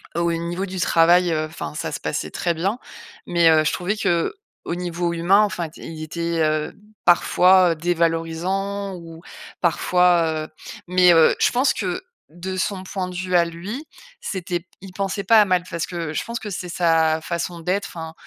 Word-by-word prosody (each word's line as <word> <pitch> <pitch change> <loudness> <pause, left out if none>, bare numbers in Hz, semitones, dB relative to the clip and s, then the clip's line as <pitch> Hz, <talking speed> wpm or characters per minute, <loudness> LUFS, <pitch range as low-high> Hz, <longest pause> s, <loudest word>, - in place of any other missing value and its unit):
au 170 0 +1
niveau 170 +3 -3
du 185 0 -5
travail, 170 +1 +4
heu, 155 0 0
enfin 155 - -7
ça - - -4
se - - -4
passait - - -3
très 170 - -1
bien 190 +7 -1 0.5
mais 170 -2 +4
heu, 155 -1 +5
je - - +1
trouvais 185 +4 -2
qu'au 175 - -2
niveau 175 -1 -2
humain, 175 +5 +4
enfin 185 -5 -2
t 155 - -15
il 160 -1 -7
était, 170 +1 -2
heu, 155 0 0 0.3
parfois 180 +1 +5
dévalorisant, 175 +4 -1
ou 165 -2 -11 0.4
parfois, 170 -2 +2
heu - - -14 0.4
mais 180 0 +5
heu, 165 -1 +5
je - - +3
pense 260 +2 +2
que 190 - -3 0.3
de 180 +3 -6
son 185 0 -2
point 185 -1 -4
de 180 - -9
vue 185 0 -2
à 170 -1 +5
lui, 185 - -6 0.4
c'était 180 - -3
p 185 - -30
il 190 -2 -11
pensait 195 +1 -2
pas 220 +2 +7
à - - +4
mal. 185 -2 +1
Parce 170 -2 -3
que 170 -3 -4
je - - -2
pense 235 0 -4
que 210 - -7
c'est 180 -2 -5
sa 165 -2 +2
façon 170 +1 -4
d'être! 190 +4 -1
Enfin, 160 -1 -7
175 Hz, 185 wpm, -22 LUFS, 165-185 Hz, 0.5 s, pas